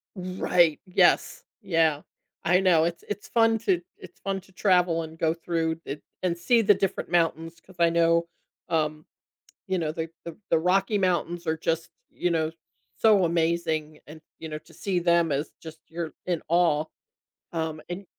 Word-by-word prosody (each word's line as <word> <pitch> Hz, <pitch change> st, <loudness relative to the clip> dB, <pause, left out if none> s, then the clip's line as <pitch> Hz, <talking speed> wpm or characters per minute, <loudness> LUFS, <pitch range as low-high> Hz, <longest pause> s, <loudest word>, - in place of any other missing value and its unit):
Right, 180 Hz, -3 st, +2 dB
yes, 185 Hz, -, +2 dB, 0.2 s
yeah. 165 Hz, -6 st, +2 dB, 0.4 s
I 180 Hz, +2 st, +4 dB
know 170 Hz, -4 st, +4 dB
it's 170 Hz, 0 st, -3 dB
it's 210 Hz, 0 st, -5 dB
fun 225 Hz, -1 st, +3 dB
to 190 Hz, -6 st, +1 dB, 0.2 s
it's 175 Hz, 0 st, -14 dB
fun 195 Hz, -1 st, -2 dB
to 190 Hz, -, -22 dB
travel 180 Hz, -4 st, +2 dB
and 160 Hz, 0 st, -10 dB
go 160 Hz, 0 st, +2 dB
through 165 Hz, -1 st, -2 dB
it 145 Hz, -, -6 dB, 0.2 s
and 175 Hz, -2 st, 0 dB
see 230 Hz, +7 st, +3 dB
the 205 Hz, -1 st, +6 dB
different 195 Hz, -1 st, -2 dB
mountains, 165 Hz, -1 st, 0 dB
'cause 185 Hz, -, -19 dB
I 170 Hz, 0 st, +5 dB
know, 170 Hz, 0 st, +3 dB, 0.4 s
um, 155 Hz, -1 st, -1 dB, 0.6 s
you 190 Hz, -1 st, 0 dB
know, 155 Hz, -2 st, -1 dB
the 160 Hz, 0 st, -4 dB
the 170 Hz, -2 st, -7 dB
the 165 Hz, -, +4 dB
Rocky 195 Hz, +4 st, +2 dB
Mountains 175 Hz, -2 st, 0 dB
are 160 Hz, 0 st, +1 dB
just, 165 Hz, 0 st, -2 dB, 0.2 s
you 175 Hz, -, -1 dB
know, 160 Hz, -1 st, +1 dB, 0.5 s
so 210 Hz, -5 st, +5 dB
amazing, 160 Hz, -2 st, 0 dB
and, 155 Hz, +1 st, -11 dB, 0.2 s
you 160 Hz, -, -7 dB
know, 155 Hz, 0 st, -5 dB
to 155 Hz, -, -20 dB
see 190 Hz, -3 st, -1 dB
them 170 Hz, -2 st, +3 dB
as 145 Hz, +3 st, -2 dB
just 160 Hz, -1 st, -10 dB
you're 165 Hz, -1 st, -5 dB
in 175 Hz, -3 st, -1 dB
awe. 165 Hz, -3 st, +3 dB, 0.7 s
Um, 160 Hz, -2 st, -3 dB
and 185 Hz, +3 st, -5 dB
170 Hz, 170 wpm, -26 LUFS, 160-180 Hz, 0.7 s, the